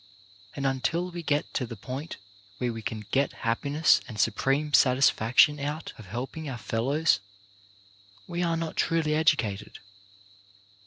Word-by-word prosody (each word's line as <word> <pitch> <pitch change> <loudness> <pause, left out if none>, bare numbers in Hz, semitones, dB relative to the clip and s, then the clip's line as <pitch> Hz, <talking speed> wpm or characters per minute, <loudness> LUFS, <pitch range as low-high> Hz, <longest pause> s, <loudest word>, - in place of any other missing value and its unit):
And 140 - -3
until 165 +7 0
we 175 0 -5
get 145 -2 -1
to 125 - -1
the 115 - -7
point 130 +9 -6 0.4
where 120 +1 -1
we 115 - -6
can 110 0 -5
get 140 +1 +1
happiness 140 +7 +3
and 110 -4 -8
supreme 135 +8 +1
satisfac 130 -4 +3
tion 150 0 +7
out 150 +3 -4
of 110 - -11
helping 130 - -5
our 130 - -5
fellows, 135 +6 +1 1.1
we 175 +8 -3
are 170 -1 +1
not 165 -1 -4
truly 165 -2 +1
educated. 110 -10 +1
140 Hz, 145 wpm, -27 LUFS, 115-155 Hz, 1.1 s, tion